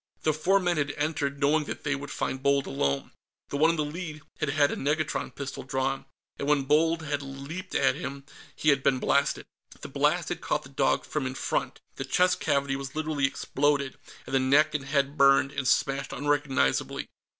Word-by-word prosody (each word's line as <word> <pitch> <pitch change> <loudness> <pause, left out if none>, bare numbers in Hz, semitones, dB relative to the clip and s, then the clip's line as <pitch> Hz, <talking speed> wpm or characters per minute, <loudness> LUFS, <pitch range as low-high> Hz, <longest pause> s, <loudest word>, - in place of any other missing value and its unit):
The 155 - +3
four 185 +6 +3
men 175 -2 0
had 145 -1 0
entered, 145 -2 -1
knowing 150 +2 +3
that - - -6
they 145 - 0
would 140 0 -5
find 130 -1 -3
Bold 140 0 +2
alone. 70 - -1 0.4
The 140 - -2
one 160 +3 +5
in 165 - +2
the 155 -2 0
lead 155 -1 -6 0.2
had 155 - 0
had 145 0 +3
a - - -2
negatron 150 +1 -1
pistol 140 -1 -6
drawn, 135 0 -2 0.3
and 140 - -2
when 145 -2 +3
Bold 160 +4 +2
had 145 -2 -2
leaped 140 +7 -7
at 135 - +2
them, 140 0 -6 0.3
he 155 - +1
had 140 -1 +4
been 135 -1 +3
blasted. 140 +2 +1 0.3
The - - -7
blast - - +1
had - - -4
caught - - -1
the - - -12
dog - - +1
from 150 -4 -2
in 130 - -5
front - - -2 0.2
the - - -3
chest 180 +7 +2
cavity 140 -2 +1
was 135 0 -6
literally 155 -3 +1
exploded, 140 0 0 0.3
and - - -8
the 135 - +4
neck 145 +4 +4
and 145 -3 -2
head 140 +1 0
burned 135 0 +5
and 140 -2 -3
smashed 135 +2 +1
unrecognizably. 145 - 0
140 Hz, 200 wpm, -27 LUFS, 135-150 Hz, 0.4 s, one